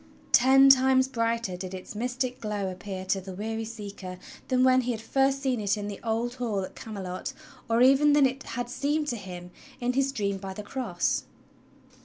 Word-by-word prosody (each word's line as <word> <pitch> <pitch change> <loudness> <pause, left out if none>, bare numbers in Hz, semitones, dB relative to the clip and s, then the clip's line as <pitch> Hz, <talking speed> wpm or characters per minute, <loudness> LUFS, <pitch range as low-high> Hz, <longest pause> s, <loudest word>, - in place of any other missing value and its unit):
Ten 270 +2 +7
times 260 0 +6
brighter 230 -5 -1
did 185 +1 -6
its 185 - -8
mystic 250 +3 -2
glow 205 -3 -2
appear 185 0 -6
to 190 +1 0
the 185 0 -8
weary 225 +3 -3
seeker 200 -4 -7 0.3
than 255 0 +2
when 255 0 +5
he 245 0 -1
had 220 - -5
first 270 +4 +1
seen 255 -4 0
it 205 0 +1
in 205 0 -4
the 205 -1 -6
old 230 +1 -1
hall 215 -5 0
at 185 - -6
Camelot, 190 -4 -6 0.4
or 230 +2 +4
even 275 +3 +6
than 290 -1 +6
it 265 +1 -1
had 240 0 -4
seemed 290 +5 -1
to 240 - -1
him 180 -4 -8 0.3
in 250 0 0
his 275 +1 +1
dream 200 -6 -2
by 190 -1 -7
the 210 - -6
cross. 205 -6 -1
230 Hz, 195 wpm, -27 LUFS, 200-260 Hz, 0.4 s, Ten